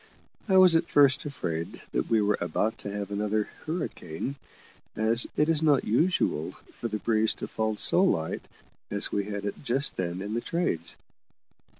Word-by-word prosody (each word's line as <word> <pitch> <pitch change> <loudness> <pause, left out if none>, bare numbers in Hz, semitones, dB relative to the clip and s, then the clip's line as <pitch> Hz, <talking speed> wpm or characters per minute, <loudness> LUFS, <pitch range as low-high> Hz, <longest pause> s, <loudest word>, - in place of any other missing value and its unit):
I 190 - +5
was 185 -3 +7
at 165 +1 +2
first 140 0 +4
afraid 85 - -4
that - - -1
we 110 -2 +3
were 105 +1 +1
about 90 +6 -1
to 100 - -6
have 100 0 -5
another 105 +1 -1 0.2
hurricane, 140 - -4 0.6
as 110 +2 +2
it 150 - +3
is 160 -2 +2
not 150 -4 +3
usual 120 - +1 0.2
for 115 - -4
the 110 -1 -3
breeze 110 0 +1
to - - -6
fall 110 -1 -1
so 180 - +5
light 80 - 0 0.4
as - - -2
we 100 -1 -1
had 100 -1 -5
it 100 - -5
just 135 +2 0
then 90 -1 -2
in 105 +1 -4
the 120 - -1
trades. 170 - -2
110 Hz, 175 wpm, -27 LUFS, 100-145 Hz, 0.6 s, was